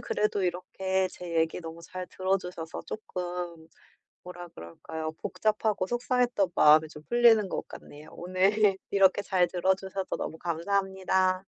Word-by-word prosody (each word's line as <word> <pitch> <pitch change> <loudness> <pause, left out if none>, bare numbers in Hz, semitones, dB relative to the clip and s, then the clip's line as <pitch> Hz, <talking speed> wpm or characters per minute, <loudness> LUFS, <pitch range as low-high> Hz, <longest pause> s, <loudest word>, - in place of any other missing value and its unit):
그래도 210 -2 0
이렇게 190 +1 -1
제 175 -2 -6
얘기 160 +2 0
너무 165 0 -8
잘 185 +1 -7
들어 190 +2 0
주셔서 175 -3 -7
쪼끔 175 -5 -5 0.6
뭐라 175 -1 -9
그럴까요. 155 - -7
복잡하고 215 -2 0
속상했던 240 -5 +1
마음이 155 +1 +6
좀 150 0 -12
풀리는 230 -1 +5
것 - - -4
같네요. 150 +1 -12
오늘 190 +3 +2
이렇게 195 0 +4
잘 185 -3 +2
들어 185 +1 +2
주셔서 190 0 -5
너무 160 - -5
감사합니다. 190 +2 0
185 Hz, 320 characters per minute, -28 LUFS, 170-195 Hz, 0.6 s, 마음이